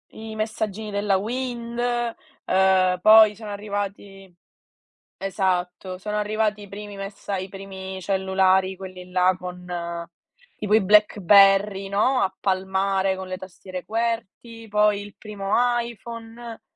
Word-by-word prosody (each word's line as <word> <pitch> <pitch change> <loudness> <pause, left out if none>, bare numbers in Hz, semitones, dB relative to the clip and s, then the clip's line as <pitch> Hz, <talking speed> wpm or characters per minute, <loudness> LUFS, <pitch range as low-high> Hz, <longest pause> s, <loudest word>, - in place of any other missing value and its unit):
i 220 0 -8
messaggini 215 -1 -3
della 200 -1 +1
Wind, 235 +2 -4 0.7
ehm, 185 -1 +3
poi 215 +1 +8
sono 210 0 -8
arrivati 200 -2 -6 0.8
esatto, 185 -1 -2
sono 210 +3 -4
arrivati 210 0 0
i - - -11
primi 205 +1 -8
messa 195 0 -5
i 190 0 -4
primi 190 -1 -8
cellulari 190 0 +2
quelli 185 -1 -10
là 185 0 +3
con 180 0 -8 0.9
tipo 210 0 -1
i 220 - +6
BlackBerry, 200 0 +5
no, 250 +6 +2
a 190 - 0
palmare 190 0 0
con 190 0 -7
le 185 0 -4
tastiere 185 0 -9
qwerty, 230 0 -3
poi 210 0 +3
il 205 0 -11
primo 205 -2 -5 0.3
iPhone, 230 0 -9
200 Hz, 120 wpm, -24 LUFS, 190-215 Hz, 0.9 s, poi